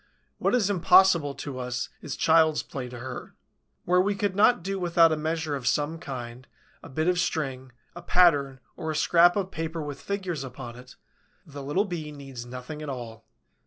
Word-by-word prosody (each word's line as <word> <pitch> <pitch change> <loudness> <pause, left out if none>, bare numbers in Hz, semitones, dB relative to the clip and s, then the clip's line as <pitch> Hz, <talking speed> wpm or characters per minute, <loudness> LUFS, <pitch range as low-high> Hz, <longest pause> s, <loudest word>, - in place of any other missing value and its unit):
What - - +2
is 225 -6 +2
impossible 180 -6 +4
to 135 -3 -6
us 125 0 -3
is 135 - -5
child's 160 -1 +3
play 130 -4 -6
to 120 - -9
her. 125 +1 -8 0.5
Where 180 +1 +4
we 200 +2 0
could 200 -1 -1
not 210 -1 +4
do 195 +1 -3
without 170 -2 +4
a - - +2
measure 160 -1 -2
of 130 -3 -5
some 150 +4 0
kind, 125 -3 -7 0.3
a - - -11
bit 155 +5 -1
of 180 0 +2
string, 130 -7 -2 0.2
a 175 - -8
pattern 145 -7 +3
or 160 -2 -5
a 155 - -2
scrap 175 +3 +5
of 195 -2 -2
paper 165 +1 -4
with 145 -2 -7
figures 185 -7 -3
upon 125 -2 -8
it, 125 +1 -13 0.5
the 145 -2 -9
little 150 +9 0
Bee 165 -6 -5
needs 135 -4 -9
nothing 125 +5 -7
at 150 - -5
all. 115 -4 -7
155 Hz, 190 wpm, -26 LUFS, 130-175 Hz, 0.5 s, scrap